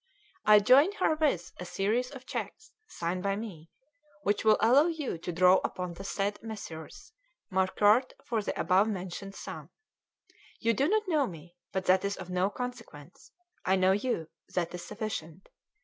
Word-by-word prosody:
I 210 0 +9
join 265 - +6
herewith 310 - +1
a - - -4
series 220 +8 0
of 260 -2 -11
cheques, 440 +10 -6 0.2
signed 175 - -3
by 195 +1 0
me, 190 -7 -8 0.5
which 205 - +1
will 215 -1 +5
allow 255 +9 +5
you 310 - -3
to 175 - -4
draw 180 +2 +5
upon 180 -1 -3
the 190 - -9
said 200 +1 -2
Messrs. 205 - -8 0.4
Marcuart 205 +6 +3
for 230 -2 0
the - - -4
above 190 +3 +3
mentioned 195 -1 -5
sum. - - -8 0.9
You 230 +1 +2
do 270 +6 +2
not 430 +2 +1
know 305 -6 +2
me, 170 -1 -11 0.2
but 190 -1 -2
that 185 +1 +4
is 200 0 -2
of 180 - -8
no 180 +2 +1
consequence. 230 - -8 0.3
I 190 - +3
know 185 0 +4
you: 205 -5 -1 0.3
that 175 -1 -1
is 175 -1 -6
sufficient. 195 -6 -6
200 Hz, 165 wpm, -30 LUFS, 180-245 Hz, 0.9 s, I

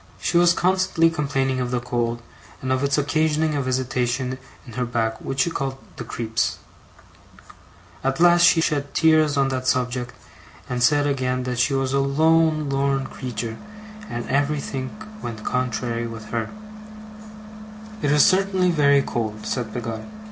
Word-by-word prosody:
She - - -2
was 175 0 +5
constantly 180 -2 +2
complaining 135 -4 -1
of 125 -1 -1
the 125 0 0
cold, 120 -1 -2 0.4
and 130 - -3
of 130 +1 0
its 140 +1 +1
occasioning 155 +1 +1
a 145 - 0
visitation 130 0 -1 0.3
in 120 - -11
her 125 - -1
back 115 -2 -2
which 135 0 -1
she 170 - +1
called 135 -3 -3 0.2
'the - - -6
creeps'. 110 -1 -2 1.5
At 135 0 0
last 175 0 +6
she 170 -1 +6
shed 145 -3 -1
tears 155 -2 +4
on 135 -1 +3
that 130 -1 -3
subject, 125 -1 -1 0.5
and 125 -1 -3
said 145 +3 +4
again 130 -2 0
that 125 -1 -3
she 135 +3 +2
was 135 0 0
'a 140 - +3
lone 155 +2 +3
lorn 135 0 0
creetur' 115 -4 -5 0.5
and 120 0 -4
everythink 140 -1 -1 0.3
went 110 -2 -6
contrary 120 -1 -2
with 115 -2 -9
her'. 115 -1 -2 1.5
'It 145 - +1
is 150 0 +6
certainly 190 -1 +3
very 140 -3 +4
cold,' 110 -2 -4
said 120 -4 -3
Peggotty. 115 - -5
135 Hz, 155 wpm, -23 LUFS, 125-150 Hz, 1.5 s, last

